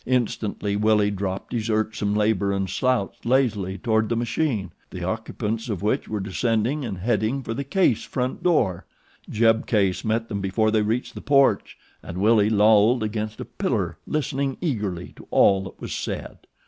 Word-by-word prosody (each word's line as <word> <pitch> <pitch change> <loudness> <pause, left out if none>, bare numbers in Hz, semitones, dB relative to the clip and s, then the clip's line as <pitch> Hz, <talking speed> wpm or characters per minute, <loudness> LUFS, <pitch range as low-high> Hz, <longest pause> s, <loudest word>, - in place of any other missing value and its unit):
Instantly 110 -4 -1
Willie 105 0 +3
dropped 95 +1 -4
his 115 -1 -2
irksome 110 -1 0
labor 105 -2 +2
and 95 -1 -1
slouched 125 -2 -1
lazily 110 -7 +1
toward 110 +2 +1
the 115 - +1
machine, 115 - -1 0.2
the 90 -2 -7
occupants 110 +3 -3
of 100 -3 -3
which 105 - 0
were 105 - -3
descending 115 +8 0
and 105 -6 -4
heading 110 +6 0
for 115 - -4
the 140 +4 -3
Case 140 - +2
front 125 0 -3
door. 115 - +1 0.4
Jeb 115 0 +2
Case 100 -5 +1
met 115 +1 0
them 100 -3 -3
before 110 +3 +1
they 110 -1 +3
reached 110 +4 -1
the - - -8
porch 140 -1 +2 0.2
and 90 - -8
Willie 105 +1 +4
lolled 110 +2 +4
against 110 0 -3
a - - -5
pillar - - -2
listening 140 -2 -1
eagerly 105 - -3
to - - -13
all 95 -1 +4
that 95 - -10
was - - -5
said. - - -5
110 Hz, 170 wpm, -24 LUFS, 100-120 Hz, 0.4 s, Willie